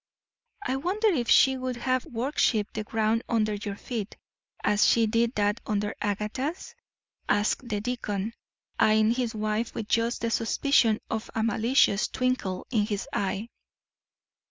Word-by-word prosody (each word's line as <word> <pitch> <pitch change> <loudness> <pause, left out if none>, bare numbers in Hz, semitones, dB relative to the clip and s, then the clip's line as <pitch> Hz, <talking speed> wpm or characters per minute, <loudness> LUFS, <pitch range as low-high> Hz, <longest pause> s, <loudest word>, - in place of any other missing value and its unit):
"I 260 - 0
wonder 395 +9 +1
if 250 - 0
she 265 0 +6
would 255 -1 -3
have 255 +1 -1
worshipped 230 -3 0
the 215 - -3
ground 220 +1 0
under 215 -2 +1
your 205 -1 -4
feet, 220 -1 -5 0.5
as 210 0 +3
she 230 -1 +4
did 230 +2 +1
that 205 +1 +1
under 210 -1 -1
Agatha's?" 240 - -3 0.6
asked 210 +4 +1
the 210 -2 -1
deacon, 220 -3 -3 0.5
eying 215 +1 +4
his 240 -2 -1
wife 215 +2 -2
with 215 - -4
just 230 +2 0
the 230 0 -1
suspicion 230 -1 +2
of 220 0 -3
a 220 - +1
malicious 225 -1 +3
twinkle 255 -8 -1
in 210 -4 +1
his 205 -3 -3
eye. 200 +3 -2
225 Hz, 145 wpm, -27 LUFS, 210-250 Hz, 0.6 s, she